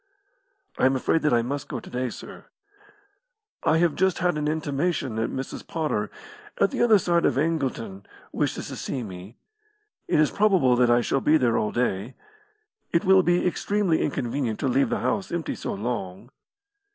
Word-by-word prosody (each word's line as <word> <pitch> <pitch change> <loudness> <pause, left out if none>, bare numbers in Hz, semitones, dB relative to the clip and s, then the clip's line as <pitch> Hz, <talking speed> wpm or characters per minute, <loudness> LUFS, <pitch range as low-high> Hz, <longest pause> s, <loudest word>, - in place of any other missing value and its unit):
"I - - +5
am 135 - +1
afraid 155 +5 +1
that 150 - +2
I 120 -1 +3
must 140 +4 -4
go - - -4
to - - -14
day, 125 0 -2
sir." - - -10 1.2
"I 160 - +3
have 170 -2 +2
just 190 -1 +1
had 180 -1 +1
an 150 0 -1
intimation 150 -3 -1
that 115 +1 -1
Mrs. 130 - -6
Potter, 150 -11 -2 0.5
at 195 - +3
the - - -2
other 230 -3 +6
side 170 -2 +1
of - - +2
Angleton, 135 -10 -2 0.2
wishes - - -2
to - - -6
see 130 - -4
me. 95 +2 -10 0.7
It - - +2
is 150 - +3
probable 190 -12 +3
that 120 0 +3
I 120 0 +4
shall 135 +3 0
be 155 +1 +4
there 120 -5 +2
all 105 - 0
day. 120 -1 -1 0.8
It 170 - +1
will 190 0 +6
be 175 0 +1
extremely 190 -1 +1
inconvenient 125 -4 -2
to - - +1
leave 130 +2 +2
the - - -1
house 195 -2 -1
empty 170 -2 -2
so - - -4
long." 105 0 -5
140 Hz, 180 wpm, -25 LUFS, 120-170 Hz, 1.2 s, other